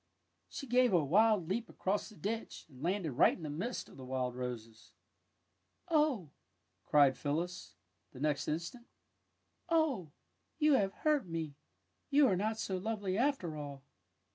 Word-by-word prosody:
She 285 - -6
gave 250 -2 +3
a 165 -5 +4
wild 205 +2 +4
leap 220 +6 -2
across 200 +2 -2
the 215 - -14
ditch, 225 +3 -4
and 130 -4 -15
landed 175 -1 0
right 130 - +4
in 170 - -11
the 150 - -4
midst 200 +12 -3
of - - -15
the 130 - -9
wild 130 -1 -2
roses. 115 -3 -7 0.5
'' - - -34
Oh! 295 - +2 0.3
" - - -47
cried 140 -3 +6
Phyllis, 165 +6 -3 0.4
the 130 - -12
next 150 0 0
instant. 170 +10 -4
^' - - -38 0.8
Oh, 305 - +1 0.5
you 305 -1 +4
have 200 -7 +3
hurt 295 0 +1
me! 165 -3 -4 0.6
You 285 +1 +6
are 195 - +3
not 215 +4 -1
so 190 -3 -2
lovely, 200 -1 -2
after 235 - 0
all! 140 -2 -7
185 Hz, 165 wpm, -34 LUFS, 150-230 Hz, 0.8 s, cried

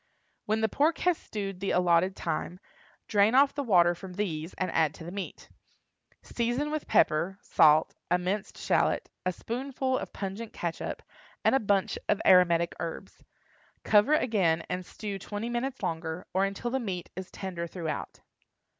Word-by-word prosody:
When 215 +1 +1
the 220 - +3
pork 300 +9 +2
has 360 -1 +4
stewed 195 - -6
the 195 - -2
allotted 180 +1 +3
time, 175 +3 -3 0.5
drain 210 +3 +4
off 275 +1 +5
the 285 - -2
water 175 -9 +4
from 180 +1 -9
these 170 -4 -3
and 185 -2 -2
add 155 -2 +2
to - - -10
the 170 - -7
meat. 195 0 -6 0.8
Season 245 +5 -1
with 310 -1 -3
pepper, 170 +5 +2
salt, 155 +1 +5 0.2
a 180 - +4
minced 190 +3 -3
shallot, - - +1 0.2
a - - +2
spoonful 260 +5 -2
of - - -7
pungent 205 +3 -5
catsup, 170 -1 -4 0.4
and - - +5
a 270 - +4
bunch 200 -4 +1
of 210 - +3
aromatic 170 -2 +5
herbs. 165 -1 -6 0.6
Cover 215 +8 +5
again, 185 - +2
and 180 0 -2
stew 200 +1 -6
twenty 205 +4 -5
minutes 240 0 -3
longer, 160 -1 -3
or 190 +1 +3
until 200 +5 -3
the 265 - 0
meat 190 -7 -5
is 185 0 -6
tender 175 -3 -5
throughout. 165 -4 -5
195 Hz, 165 wpm, -29 LUFS, 175-230 Hz, 0.8 s, off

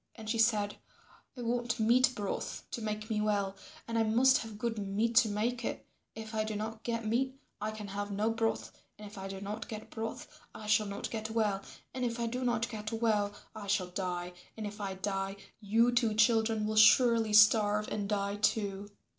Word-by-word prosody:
And 220 -2 -10
she 225 +1 -1
said, 215 -2 +2 0.6
"I 245 - -5
want 240 +1 -1
meat 250 +4 +4
broth 205 -2 -4
to 235 - -4
make 215 0 -3
me 210 -1 +1
well 200 -2 0 0.3
and 230 0 0
I - - +4
must 245 +4 +4
have 220 -2 -7
good 225 0 -2
meat 205 +4 0
to 235 -2 +6
make 235 +4 -1
it. - - -4 0.3
If 220 0 -8
I 215 -1 +1
do 215 0 -4
not 220 +1 -4
get 230 -1 -3
meat 260 +4 0 0.2
I 215 - -1
can 215 -2 -7
have 205 +1 -4
no 210 +3 0
broth, 225 0 -1 0.3
and 210 - -10
if 205 - -10
I 190 - -5
do 195 0 -6
not 205 +3 -6
get 215 -1 -7
broth 225 0 -5 0.3
I 215 - -8
shall 215 0 +3
not 200 0 -5
get 220 -1 -3
well, 215 -3 0 0.3
and 255 - -3
if 235 -1 -1
I 235 - 0
do 250 +3 -3
not 235 -1 +1
get 215 -2 -6
well 220 -3 +1 0.2
I 210 -2 -7
shall 190 -2 +1
die, 180 -1 -3 0.2
and 220 - -4
if 210 +1 -6
I 195 -1 -3
die 195 0 -2 0.2
you 225 +3 +3
two 235 -3 +2
children 220 0 +3
will 215 0 -2
surely 225 0 +6
starve 210 0 +6
and 205 -1 -3
die 200 -1 -1
too. 205 -2 0
215 Hz, 205 wpm, -32 LUFS, 205-230 Hz, 0.6 s, to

